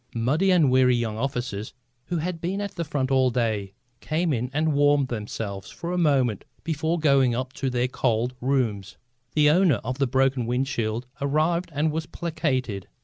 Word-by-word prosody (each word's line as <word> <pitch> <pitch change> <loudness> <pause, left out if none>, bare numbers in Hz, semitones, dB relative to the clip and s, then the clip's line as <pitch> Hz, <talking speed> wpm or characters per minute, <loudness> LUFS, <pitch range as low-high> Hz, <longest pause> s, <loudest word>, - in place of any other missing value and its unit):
Muddy 140 +12 +2
and 165 -8 +4
weary 130 -1 +5
young 115 -3 -1
officers, 125 -5 -3 0.3
who 175 - -2
had 165 +1 -3
been 185 +4 -2
at 205 -1 -3
the 170 - -3
front 140 -4 -2
all 130 -1 +4
day, 110 -5 -1 0.2
came 160 +1 0
in 125 0 -2
and 155 +2 +1
warmed 145 -2 +3
themselves 105 -3 -5
for 170 - -6
a 180 - -1
moment 135 - +2 0.2
before 160 +1 -1
going 140 -6 +3
up 130 +1 -3
to 135 - -2
their 125 0 0
cold 125 -1 0
rooms. 110 -6 -1 0.4
The 150 -1 +5
owner 165 - +4
of 125 +3 -4
the 135 - +2
broken 130 -1 +1
wind 125 +3 0
shield 115 -2 -2 0.2
arrived 155 +5 +1
and 150 +1 0
was 160 +1 -3
placated. 135 - -2
135 Hz, 180 wpm, -25 LUFS, 120-155 Hz, 0.4 s, weary